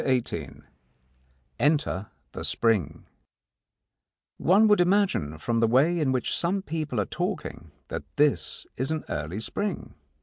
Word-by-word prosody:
XVIII 130 Hz, -3 st, -1 dB, 1.0 s
ENTER 145 Hz, -9 st, +1 dB, 0.2 s
THE -, -, -6 dB
SPRING 110 Hz, -9 st, +1 dB, 1.3 s
One 200 Hz, +5 st, +5 dB
would 210 Hz, -3 st, +5 dB
imagine 180 Hz, -, +2 dB
from 115 Hz, +8 st, -1 dB
the 115 Hz, -, +4 dB
way 145 Hz, +9 st, +3 dB
in 145 Hz, -4 st, +2 dB
which 130 Hz, -2 st, 0 dB
some 190 Hz, +3 st, 0 dB
people 155 Hz, -, -3 dB
are 100 Hz, -, +1 dB
talking 80 Hz, -2 st, -4 dB, 0.2 s
that -, -, -4 dB
this 140 Hz, -, +1 dB
is 130 Hz, +2 st, -1 dB
an 160 Hz, -1 st, -2 dB
early 80 Hz, +7 st, -3 dB
spring. 200 Hz, -, -3 dB
135 Hz, 130 wpm, -27 LUFS, 110-175 Hz, 1.3 s, One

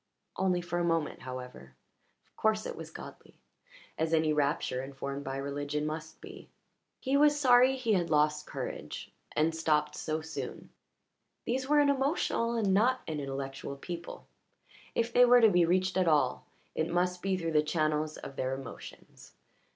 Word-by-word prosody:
Only 185 Hz, -2 st, +1 dB
for 175 Hz, 0 st, -3 dB
a -, -, +1 dB
moment, 165 Hz, -3 st, 0 dB
however, 125 Hz, -, -8 dB, 0.5 s
of -, -, -38 dB
course 215 Hz, 0 st, +1 dB
it -, -, -4 dB
was 165 Hz, -1 st, -8 dB
godly, -, -, -11 dB, 0.6 s
as 160 Hz, +1 st, +2 dB
any 155 Hz, -1 st, +2 dB
rapture 140 Hz, -3 st, 0 dB
informed 140 Hz, +1 st, -5 dB
by 135 Hz, 0 st, -4 dB
religion 145 Hz, +2 st, -3 dB
must 155 Hz, +1 st, -6 dB
be. -, -, -11 dB, 0.5 s
He 265 Hz, +1 st, 0 dB
was 295 Hz, +1 st, +5 dB
sorry 255 Hz, -1 st, +6 dB
he 245 Hz, -4 st, 0 dB
had 175 Hz, -3 st, +1 dB
lost 150 Hz, 0 st, +2 dB
courage -, -, -6 dB, 0.2 s
and 160 Hz, +2 st, +2 dB
stopped 150 Hz, -2 st, +1 dB
so 155 Hz, 0 st, -2 dB
soon. 160 Hz, 0 st, -7 dB, 0.7 s
These 260 Hz, +2 st, -2 dB
were 300 Hz, -, +5 dB
an 290 Hz, -1 st, +4 dB
emotional 270 Hz, -4 st, 0 dB
and 205 Hz, -4 st, +2 dB
not 250 Hz, +6 st, +3 dB
an 155 Hz, -2 st, -3 dB
intellectual 135 Hz, 0 st, -5 dB
people 170 Hz, +4 st, -7 dB, 0.7 s
if 230 Hz, 0 st, 0 dB
they 245 Hz, -, +7 dB
were 245 Hz, 0 st, +7 dB
to 225 Hz, -3 st, +6 dB
be 175 Hz, -2 st, +4 dB
reached 185 Hz, +1 st, +1 dB
at 185 Hz, -2 st, +2 dB
all, 145 Hz, -5 st, +2 dB, 0.3 s
it 160 Hz, +1 st, -1 dB
must 180 Hz, +1 st, 0 dB
be 190 Hz, -1 st, 0 dB
through 165 Hz, -2 st, -2 dB
the 150 Hz, -1 st, +4 dB
channels 155 Hz, 0 st, 0 dB
of 135 Hz, -, -9 dB
their 130 Hz, +1 st, -1 dB
emotions. 130 Hz, -3 st, -11 dB
160 Hz, 165 wpm, -30 LUFS, 150-215 Hz, 0.7 s, they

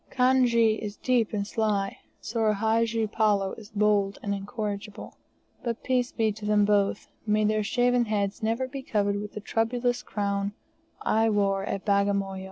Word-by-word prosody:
Kanjee 245 Hz, -4 st, +3 dB
is 210 Hz, -1 st, -5 dB
deep 245 Hz, -4 st, +1 dB
and 205 Hz, -2 st, -2 dB
sly, 205 Hz, -2 st, -1 dB, 0.2 s
Soor 220 Hz, -2 st, 0 dB
Hadji 225 Hz, +1 st, +1 dB
Palloo 205 Hz, -2 st, +1 dB
is 215 Hz, -2 st, -13 dB
bold 205 Hz, -1 st, +1 dB
and 200 Hz, -, -1 dB
incorrigible. 205 Hz, 0 st, -5 dB, 0.5 s
But 235 Hz, -2 st, -3 dB
peace 255 Hz, -1 st, +1 dB
be 220 Hz, -2 st, +1 dB
to 210 Hz, +1 st, -10 dB
them 210 Hz, -1 st, +4 dB
both, 205 Hz, -1 st, +1 dB, 0.2 s
may 215 Hz, 0 st, +2 dB
their 215 Hz, 0 st, +2 dB
shaven 245 Hz, +2 st, +2 dB
heads 205 Hz, -1 st, -1 dB
never 230 Hz, +4 st, 0 dB
be 270 Hz, +1 st, -6 dB
covered 205 Hz, -4 st, 0 dB
with 210 Hz, 0 st, -7 dB
the 210 Hz, -, -6 dB
troublous 240 Hz, +3 st, 0 dB
crown 200 Hz, -1 st, -2 dB, 0.5 s
I 225 Hz, +1 st, +2 dB
wore 195 Hz, -2 st, +1 dB
at 195 Hz, -1 st, -4 dB
Bagamoyo! 200 Hz, -1 st, +1 dB
215 Hz, 160 wpm, -27 LUFS, 200-230 Hz, 0.5 s, them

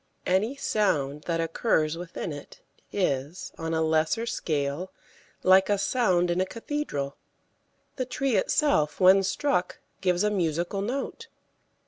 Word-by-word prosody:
Any 205 Hz, +8 st, +1 dB
sound 150 Hz, -, 0 dB
that 165 Hz, -1 st, -1 dB
occurs 165 Hz, -1 st, +1 dB
within 170 Hz, -1 st, -5 dB
it 145 Hz, 0 st, -11 dB, 0.3 s
is, 150 Hz, -3 st, -2 dB
on 165 Hz, 0 st, -3 dB
a 160 Hz, -, +1 dB
lesser 160 Hz, +8 st, +1 dB
scale, 150 Hz, -3 st, -2 dB, 0.5 s
like 190 Hz, +1 st, +5 dB
a 205 Hz, -, +3 dB
sound 185 Hz, -5 st, +2 dB
in 175 Hz, +2 st, +1 dB
a -, -, +2 dB
cathedral. 225 Hz, -, -4 dB, 0.8 s
The 255 Hz, -, -1 dB
tree 265 Hz, -1 st, -1 dB
itself 185 Hz, -, +2 dB
when 190 Hz, +1 st, +7 dB
struck 195 Hz, -1 st, 0 dB, 0.2 s
gives 180 Hz, 0 st, +2 dB
a 210 Hz, -, +2 dB
musical 175 Hz, 0 st, -1 dB
note. 275 Hz, -, -4 dB
180 Hz, 130 wpm, -27 LUFS, 160-210 Hz, 0.8 s, when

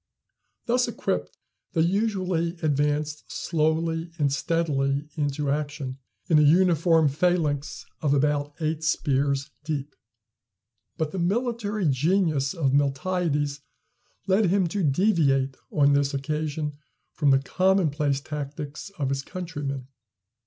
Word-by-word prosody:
Thus 245 Hz, +1 st, +2 dB
equipped, -, -, -3 dB, 0.4 s
they 165 Hz, -, +2 dB
usually 185 Hz, -2 st, 0 dB
advanced 150 Hz, 0 st, 0 dB
slowly 165 Hz, +1 st, 0 dB
and 145 Hz, -3 st, +1 dB
steadily 145 Hz, -3 st, 0 dB
into 145 Hz, -1 st, -1 dB
action 145 Hz, -2 st, -3 dB, 0.3 s
in 155 Hz, -3 st, +5 dB
a -, -, +6 dB
uniform 165 Hz, 0 st, +4 dB
phalanx 155 Hz, -1 st, 0 dB, 0.2 s
of 150 Hz, -, +1 dB
about 145 Hz, 0 st, +1 dB
eight 160 Hz, 0 st, -2 dB
spears 140 Hz, -3 st, 0 dB
deep. 145 Hz, -2 st, -4 dB, 1.0 s
But 155 Hz, -1 st, -1 dB
the 190 Hz, -, -4 dB
military 215 Hz, +1 st, -1 dB
genius 150 Hz, 0 st, +1 dB
of 140 Hz, -5 st, +1 dB
Miltiades 145 Hz, +1 st, 0 dB, 0.7 s
led 195 Hz, +1 st, +3 dB
him 190 Hz, +1 st, +2 dB
to 200 Hz, +4 st, -2 dB
deviate 140 Hz, -5 st, +2 dB, 0.2 s
on 145 Hz, -7 st, +4 dB
this 140 Hz, 0 st, +1 dB
occasion 150 Hz, +1 st, -3 dB, 0.3 s
from 145 Hz, -2 st, +2 dB
the 135 Hz, -, +6 dB
commonplace 150 Hz, -3 st, +1 dB
tactics 145 Hz, +2 st, -6 dB
of 140 Hz, -3 st, -1 dB
his 135 Hz, 0 st, -1 dB
countrymen. 145 Hz, -6 st, -5 dB
150 Hz, 115 wpm, -26 LUFS, 140-170 Hz, 1.0 s, a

